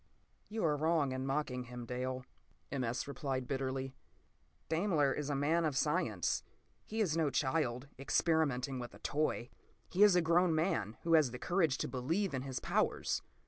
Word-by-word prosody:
p> 215 - -9
"You 220 - +1
are 150 -2 +3
wrong 155 -2 +2
in 130 +1 -3
mocking 135 -3 -1
him, 125 0 -7
Dale," 130 +1 -3 0.5
M. 135 -2 -1
S. 120 +3 -2
replied 135 -3 -3
bitterly. 135 -1 -2 0.7
"Daimler 160 -5 +2
is 150 -1 -3
a 145 - 0
man 155 +5 +2
of 150 -4 0
science. 150 - +1 0.4
He 220 +1 -3
is 170 -7 +1
no 160 -3 +2
child, 130 -1 0
experimenting 140 -3 +1
with 120 -1 -7
a - - -11
toy; 145 -5 -1 0.4
he 185 - 0
is 205 -3 +8
a 180 - +5
grown 170 0 +4
man 155 - 0
who 165 - +1
has 155 -5 +6
the 125 - -6
courage 165 -2 +1
to - - -2
believe 160 +8 -1
in 130 - -1
his 130 -1 -4
powers. - - 0
140 Hz, 180 wpm, -34 LUFS, 130-165 Hz, 0.7 s, is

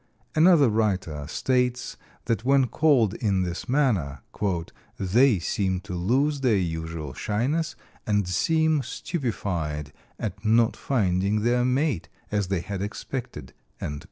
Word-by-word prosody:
Another 160 -3 +6
writer 95 -9 -1
states 125 +6 0 0.3
that 115 -2 0
when 135 +1 +4
called 125 -4 +3
in 100 -5 0
this 90 +7 -5
manner, 105 - +1 0.8
"they 110 +5 +4
seem 95 +2 -1
to 95 -1 -7
lose 135 +11 +1
their 125 -5 +3
usual 80 -4 -3
shyness 140 - -1 0.3
and 105 -3 +1
seem 160 - +2
stupefied 90 - -3 0.2
at 100 -1 -5
not 115 +1 +3
finding 100 -4 +1
their 120 +2 +2
mate, 130 - 0 0.2
as 105 -2 0
they 95 -2 -1
had 95 +1 -5
expected." 115 +5 -6
105 Hz, 120 wpm, -25 LUFS, 90-130 Hz, 0.8 s, Another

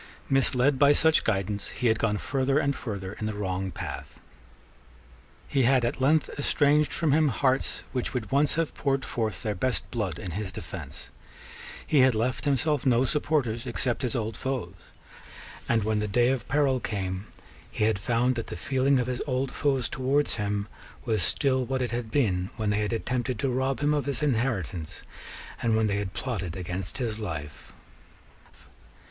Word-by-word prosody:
Misled 135 0 +3
by 145 0 +7
such 160 +1 +4
guidance, 100 -1 -1
he 125 - -5
had 110 -1 +3
gone 105 -2 +1
further 135 +4 0
and 140 -2 +1
further 100 -4 -5
in 110 - -4
the 110 - -3
wrong 95 -2 -2
path: - - -7 1.3
he 140 - +1
had 130 0 +4
at 125 +2 -2
length 150 +3 +4
estranged 145 +1 +3
from 160 -3 +1
him 155 +2 +4
hearts 130 0 0
which 125 -2 -2
would 120 -6 -4
once 145 +1 +3
have 165 -1 0
poured 135 -1 0
forth 110 -1 -2
their 105 -2 0
best 125 +6 -1
blood 105 -9 -2
in 90 - -5
his 95 +2 -4
defence: - - -7 0.7
he 150 - +3
had 130 -2 +5
left 120 +6 -1
himself 145 0 +1
no 125 -1 +4
supporters 130 -5 0
except 120 +1 -1
his 130 0 -1
old 110 -2 -2
foes; 125 -9 -3 1.0
and, 115 -2 +3
when 110 0 +1
the 105 - -1
day 120 +4 +3
of 130 -2 -1
peril 135 -2 +2
came, 95 -2 -3 0.4
he - - -2
had 110 -2 +2
found 120 +4 +2
that 115 -2 -4
the - - -6
feeling 130 +6 +2
of 125 - +1
his 125 0 -3
old 130 0 0
foes 135 -3 +1
towards 135 +1 0
him 105 -1 -1 0.4
was 110 -3 +1
still 130 -3 +1
what 130 +1 -1
it 125 -3 -1
had 120 -1 -3
been 95 -9 +1
when 110 -2 0
they 105 - +1
had 105 +1 -1
attempted 125 +1 -1
to 135 - 0
rob 130 +2 0
him 150 +1 +3
of 145 -2 0
his 140 +2 -2
inheritance, 110 - -1 0.6
and 115 -2 +2
when 110 - +2
they 100 -1 +1
had 100 -2 -3
plotted 95 -10 -3
against 90 -2 -4
his 115 -4 -2
life. 75 -8 -6
120 Hz, 180 wpm, -27 LUFS, 105-135 Hz, 1.3 s, by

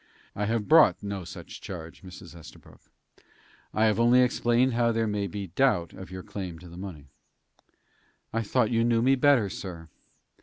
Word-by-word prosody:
"I 105 - -1
have 110 -1 -1
brought 140 - +5
no 100 -2 -4
such 85 - -10
charge, 85 -3 -9
Mrs. 90 -2 -12
Estabrook. 85 - -15 0.9
I 110 - +2
have 110 0 +2
only 120 +2 +5
explained 125 +1 +2
how 115 0 +2
there 115 0 0
may 105 -2 -2
be 100 +2 -5
doubt 105 -9 +1
of 95 0 -10
your 95 0 -8
claim 90 -4 -6
to 90 +2 -13
the 85 - -12
money." 90 -6 -8 1.3
"I 115 - 0
thought 115 +1 +1
you 115 -1 +2
knew 115 -1 +2
me 135 +2 +4
better, 135 -5 +4
sir." 85 -4 -8
105 Hz, 175 wpm, -27 LUFS, 90-120 Hz, 1.3 s, brought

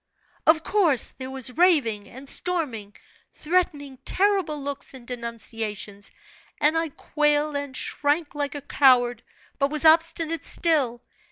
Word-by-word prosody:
"Of 320 0 +5
course, 345 - +3
there 260 0 -6
was 260 -1 -4
raving, 265 - +2
and 265 +3 -12
storming, 270 - -2 0.4
threatening, 300 -5 -1
terrible 385 -6 +1
looks 280 -1 -5
and 250 -2 -12
denunciations, 225 -4 -5 0.5
and 300 +2 +3
I 325 0 0
quailed 295 +1 0
and 285 -2 -4
shrank 295 +2 -1
like 290 -1 -3
a 290 - -5
coward, 245 -4 +3 0.4
but 275 0 +2
was 305 +1 +3
obstinate 330 0 +3
still. 275 -8 +1
285 Hz, 125 wpm, -24 LUFS, 250-320 Hz, 0.5 s, Of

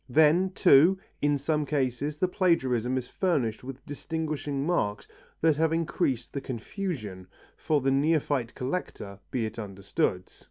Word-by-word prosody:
Then, 160 +7 +4
too, 170 +4 +6 0.2
in 145 0 +2
some 150 +2 0
cases 145 0 -1
the 185 - +2
plagiarism 130 - +1
is 125 -1 -3
furnished 130 - -1
with 135 0 -9
distinguishing 150 -2 -3
marks 110 -12 -1 0.3
that 160 -2 +3
have 160 0 +2
increased 155 -6 -1
the 140 - -3
confusion 120 - -5 0.3
for 150 -2 0
the 135 +1 +2
neophyte 140 -3 +1
collector, 125 - -4
be 120 -3 -1
it 110 +1 -6
understood. 95 -2 -2
140 Hz, 135 wpm, -28 LUFS, 120-160 Hz, 0.3 s, too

